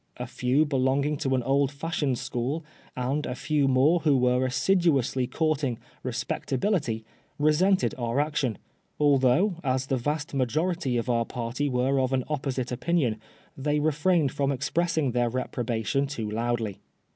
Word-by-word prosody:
A 125 Hz, -, -4 dB
few 125 Hz, +5 st, +1 dB
belonging 140 Hz, +1 st, +1 dB
to 135 Hz, -1 st, 0 dB
an 125 Hz, -, 0 dB
old 140 Hz, +2 st, +2 dB
fashioned 145 Hz, -3 st, -1 dB
school, 130 Hz, +5 st, -3 dB, 0.3 s
and 135 Hz, +4 st, -1 dB
a 125 Hz, -, -3 dB
few 140 Hz, +1 st, +1 dB
more 135 Hz, +6 st, +4 dB
who 150 Hz, -4 st, +3 dB
were 125 Hz, 0 st, +2 dB
assiduously 140 Hz, -4 st, +2 dB
courting 150 Hz, -6 st, 0 dB, 0.2 s
" -, -, -31 dB
respectability," 130 Hz, -, -1 dB, 0.3 s
resented 170 Hz, +6 st, +3 dB
our 120 Hz, +2 st, 0 dB
action; 145 Hz, -7 st, 0 dB, 0.4 s
although, 145 Hz, +6 st, +3 dB
as 130 Hz, -1 st, 0 dB
the 135 Hz, -1 st, 0 dB
vast 150 Hz, +5 st, -2 dB
majority 140 Hz, +1 st, 0 dB
of 115 Hz, -, -2 dB
our 115 Hz, -2 st, +1 dB
party 125 Hz, +5 st, -3 dB
were 130 Hz, +2 st, +1 dB
of 130 Hz, 0 st, 0 dB
an 130 Hz, -1 st, +1 dB
opposite 135 Hz, -4 st, -2 dB
opinion, 125 Hz, -5 st, 0 dB, 0.3 s
they 150 Hz, +2 st, 0 dB
refrained 155 Hz, 0 st, +2 dB
from 140 Hz, +1 st, 0 dB
expressing 150 Hz, +1 st, 0 dB
their 120 Hz, 0 st, +1 dB
reproba 120 Hz, -2 st, -3 dB
tion 140 Hz, +4 st, +1 dB
too 120 Hz, -6 st, -4 dB
loudly. 115 Hz, -1 st, -2 dB
135 Hz, 150 wpm, -27 LUFS, 125-150 Hz, 0.4 s, more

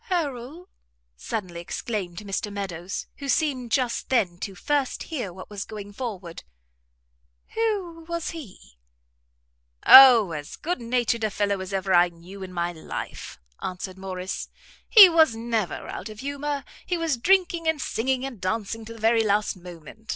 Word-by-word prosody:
"Harrel?" 315 Hz, -, -3 dB, 0.5 s
suddenly 175 Hz, -, -5 dB
exclaimed 180 Hz, 0 st, -4 dB
Mr 205 Hz, 0 st, -3 dB
Meadows, 190 Hz, -3 st, -5 dB
who 280 Hz, -1 st, -6 dB
seemed 260 Hz, -5 st, 0 dB
just 250 Hz, -4 st, 0 dB
then 195 Hz, -9 st, +1 dB
to 195 Hz, -1 st, -5 dB
first 285 Hz, +5 st, -1 dB
hear 255 Hz, -, -4 dB
what 185 Hz, +3 st, -11 dB
was 205 Hz, -1 st, -4 dB
going 205 Hz, -1 st, -9 dB
forward, 200 Hz, -8 st, -6 dB, 1.1 s
"who 395 Hz, -7 st, -2 dB
was 335 Hz, -1 st, -3 dB
he?" 185 Hz, -, -12 dB, 1.1 s
"O, 245 Hz, -8 st, +10 dB
as 150 Hz, -2 st, -6 dB
good 350 Hz, -3 st, -3 dB
natured 235 Hz, -1 st, 0 dB
a 215 Hz, -, +2 dB
fellow 200 Hz, -1 st, -1 dB
as 190 Hz, 0 st, -6 dB
ever 190 Hz, -1 st, -1 dB
I 175 Hz, 0 st, +6 dB
knew 175 Hz, +4 st, -13 dB
in 190 Hz, -1 st, -7 dB
my 175 Hz, -1 st, -2 dB
life," 160 Hz, -, -7 dB, 0.2 s
answered 185 Hz, +1 st, -5 dB
Morrice; 185 Hz, -1 st, -5 dB, 0.4 s
"he 420 Hz, -5 st, +11 dB
was 320 Hz, -8 st, +4 dB
never 225 Hz, -4 st, -2 dB
out -, -, -6 dB
of 215 Hz, 0 st, -10 dB
humour; 285 Hz, +1 st, -3 dB, 0.2 s
he 355 Hz, -, -2 dB
was 330 Hz, -4 st, 0 dB
drinking 345 Hz, +3 st, +2 dB
and 320 Hz, -2 st, +1 dB
singing 260 Hz, +1 st, -1 dB
and 245 Hz, -8 st, -8 dB
dancing 220 Hz, +3 st, -2 dB
to 230 Hz, -, -8 dB
the 230 Hz, -, -13 dB
very 225 Hz, +1 st, +3 dB
last 210 Hz, 0 st, +1 dB
moment. 180 Hz, +4 st, -13 dB
225 Hz, 155 wpm, -25 LUFS, 190-280 Hz, 1.1 s, he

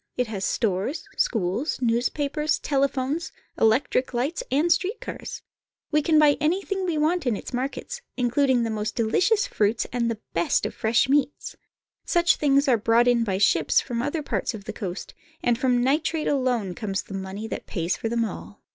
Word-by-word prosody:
It 250 Hz, -, +2 dB
has 210 Hz, -4 st, -5 dB
stores, 210 Hz, -, -1 dB
schools, 220 Hz, -, 0 dB
newspapers, 280 Hz, +6 st, 0 dB
telephones, 280 Hz, +3 st, -1 dB, 0.2 s
electric 255 Hz, +2 st, +2 dB
lights, 275 Hz, -, -1 dB
and 305 Hz, +6 st, +2 dB
street 380 Hz, +6 st, -2 dB
car -, -, -6 dB
s. -, -, -7 dB, 0.5 s
We 300 Hz, 0 st, +3 dB
can 315 Hz, +1 st, +3 dB
buy 300 Hz, -2 st, +5 dB
anything 380 Hz, +4 st, 0 dB
we 330 Hz, -3 st, 0 dB
want 315 Hz, 0 st, +1 dB
in 235 Hz, -, +2 dB
its -, -, -8 dB
markets, 275 Hz, -, -4 dB, 0.2 s
including 250 Hz, 0 st, +2 dB
the 225 Hz, -, -1 dB
most 215 Hz, 0 st, -3 dB
delicious 370 Hz, -, +2 dB
fruits 215 Hz, +2 st, 0 dB
and 235 Hz, -1 st, 0 dB
the 225 Hz, -2 st, -3 dB
best 170 Hz, +1 st, +1 dB
of -, -, -3 dB
fresh 230 Hz, +4 st, +2 dB
meats. 285 Hz, +1 st, 0 dB, 0.5 s
Such 345 Hz, 0 st, +3 dB
things 280 Hz, -1 st, +3 dB
are 250 Hz, -3 st, +4 dB
brought 230 Hz, +3 st, +3 dB
in 240 Hz, -1 st, +4 dB
by 195 Hz, -4 st, -1 dB
ships 165 Hz, -6 st, +3 dB
from 235 Hz, -2 st, -3 dB
other 300 Hz, +4 st, -2 dB
parts 250 Hz, -, -2 dB
of 205 Hz, -, -9 dB
the -, -, -6 dB
coast, 185 Hz, -5 st, -6 dB, 0.3 s
and 240 Hz, -, +3 dB
from 245 Hz, 0 st, +1 dB
nitrate 305 Hz, +4 st, +1 dB
alone 250 Hz, -9 st, 0 dB
comes 195 Hz, 0 st, -3 dB
the -, -, -11 dB
money 195 Hz, +3 st, -5 dB
that -, -, -6 dB
pays 170 Hz, -2 st, -1 dB
for 225 Hz, -, -3 dB
them 230 Hz, 0 st, +1 dB
all. 100 Hz, -, -9 dB
250 Hz, 180 wpm, -25 LUFS, 220-295 Hz, 0.5 s, buy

